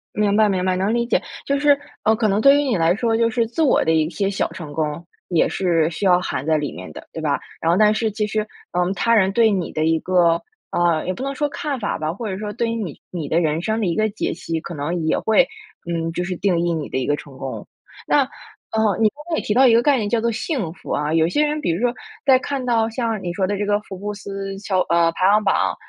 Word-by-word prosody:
明 205 -1 +2
白 215 -1 +5
明 185 -2 0
白， 185 -1 +1
能 200 +4 0
理 235 0 +1
解， - - +2 0.2
就 280 0 +1
是 290 -1 +5 0.3
呃， 220 +1 +4
可 220 -1 +1
能 200 +1 +1
对 275 +4 +6
于 - - +1
你 245 -8 0
来 165 +2 +3
说， 225 0 +1
就 230 0 +3
是 235 -2 +1
自 315 +8 -1
我 280 - +3
的 160 - +1
一 155 -1 +2
些 200 -1 -1
小 195 - -1
成 155 -4 -8
功， 155 +2 -3 0.2
也 170 -3 +2
是 170 -4 +1
需 185 +4 -4
要 180 -1 +5
含 135 -5 -3
在 160 -1 +2
里 145 -2 -3
面 90 -4 -9
的， - - -11
对 - - -6
吧？ - - 0 0.2
然 165 - +1
后 - - +3
但 215 0 +5
是 220 -1 0
其 210 0 -2
实， 215 +1 -2 0.3
嗯， 180 +2 +1
他 230 +5 +2
人 190 -2 +3
对 225 +1 +4
你 190 -4 -1
的 155 0 0
一 160 0 +2
个 175 -2 +3 0.3
呃， 170 -2 +1
也 185 - 0
不 260 - -6
能 275 0 -2
说 295 +1 -1
看 290 -5 -3
法 205 - -2
吧， 155 +1 -2
或 215 +1 -5
者 190 - -3
说 210 0 -5
对 235 0 -1
于 230 - -2
你 195 -9 -5
你 165 -5 -5
的 165 - +2
人 160 0 0
生 220 +1 0
的 205 - 0
一 170 - 0
个 215 0 +2
解 215 - -3
析， 165 -2 -4
可 170 - -7
能 160 +4 -2
也 - - +2
会， 220 +4 +3 0.4
嗯， 165 0 -1
就 180 - -2
是 180 0 -3
定 180 -2 +1
义 170 0 0
你 155 -3 -4
的 130 - -1
一 130 - -2
个 145 - +2
成 140 -2 -12
功。 135 - -6 0.4
那， 290 - +4
呃， 260 - -2
你 215 - +5
刚 285 - -37
才 320 - +1
也 - - 0
提 - - -3
到 265 +1 +6
一 230 - +5
个 230 - +5
概 280 0 +3
念 210 -3 -1
叫 230 0 +1
做 235 0 +1
幸 225 - -2
福 - - -10
啊， 150 +1 0
有 160 0 +3
些 295 - +1
人 300 +1 0
比 230 - 0
如 175 +7 -2
说， 245 -1 +2 0.3
在 265 -2 +6
看 270 0 -3
到 225 -2 +2
像 225 -4 -2
你 175 -1 -3
说 190 0 0
的 205 0 -1
这 205 - -1
个 205 0 +2
福 195 -3 -9
布 205 +2 -4
斯 195 -1 -6
乔 190 -2 -1
呃， 170 0 +3
排 185 +2 +2
行 210 +1 +3
榜， - - +1
200 Hz, 300 characters per minute, -21 LUFS, 170-230 Hz, 0.4 s, 对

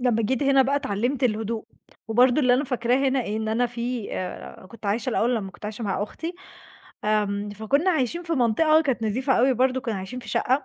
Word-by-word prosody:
لمّا 240 -3 +2
جيت 260 +6 0
هنا 275 -1 +5
بقى 275 +2 +1
اتعلّمت 255 +1 -1
الهدوء. 220 -1 -1 0.4
وبرضو 245 +5 +4
اللي 250 -3 +4
أنا 265 +4 +1
فاكراه 250 -2 +1
هنا 260 -2 0
إن 220 +1 -2
أنا 235 +3 +1
في 240 -2 -4
آآ 185 0 -6
كنت 220 +1 -10
عايشة 230 +6 0
الأول 240 +1 +1
لمّا 195 -3 -4
كنت 190 - -16
عايشة 215 +2 -5
مع 195 0 -1
أختي 330 +11 -5 0.7
آمم، 205 -1 0
فكُنا 245 - +1
عايشين 330 +2 0
في 335 -1 -4
منطقة 310 +5 +4
كانت 265 -6 -1
نضيفة 255 +5 0
أوي 260 +3 +4
برضه، 260 +1 +1
كُنا 230 -3 -3
عايشين 190 +6 -6
في 240 - -10
شقة 260 +5 +1
245 Hz, 205 wpm, -24 LUFS, 215-265 Hz, 0.7 s, هنا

